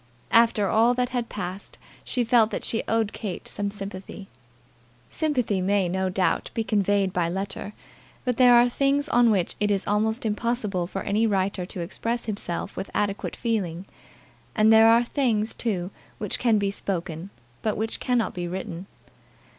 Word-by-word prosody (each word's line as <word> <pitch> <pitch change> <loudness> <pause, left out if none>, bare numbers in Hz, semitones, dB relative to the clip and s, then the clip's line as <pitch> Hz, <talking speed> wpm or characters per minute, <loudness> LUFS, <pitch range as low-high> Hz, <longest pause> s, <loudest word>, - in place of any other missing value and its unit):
After 230 -3 +4
all 230 +4 +3
that 250 0 0
had 245 -2 -3
passed 190 0 -6 0.3
she 245 - 0
felt 230 -2 +4
that - - -4
she 225 - -1
owed 225 -2 0
Kate 200 -6 -5
some 205 0 -2
sympathy. 195 -1 -8 0.8
Sympathy 250 - 0
may, 195 0 +2
no 190 +1 -1
doubt, 185 0 0
be 225 - 0
conveyed 200 -3 +1
by 170 -2 0
letter; 195 +3 -3 0.5
but 250 -2 0
there 245 -1 +7
are 240 +1 +6
things 275 +3 +1
on 240 -1 +4
which 195 -5 +1
it 210 0 +1
is 200 -1 0
almost 220 +3 0
impossible 210 -4 -1
for 195 +1 -5
any 215 +3 +1
writer 190 -2 -1
to 185 - -5
express 230 +7 -3
himself 205 -5 -3
with - - -5
adequate 205 -1 -1
feeling; 195 -7 -2 0.7
and 215 +1 +5
there 220 0 +7
are 230 +1 +5
things, 230 -4 0
too, 190 -5 -2 0.3
which 210 - -2
can 230 -3 +3
be 200 -1 0
spoken, 175 -3 -4 0.3
but 215 - -1
which 220 +2 -3
cannot 245 -3 0
be 175 -1 -4
written. 180 0 -6
210 Hz, 165 wpm, -25 LUFS, 190-230 Hz, 0.8 s, there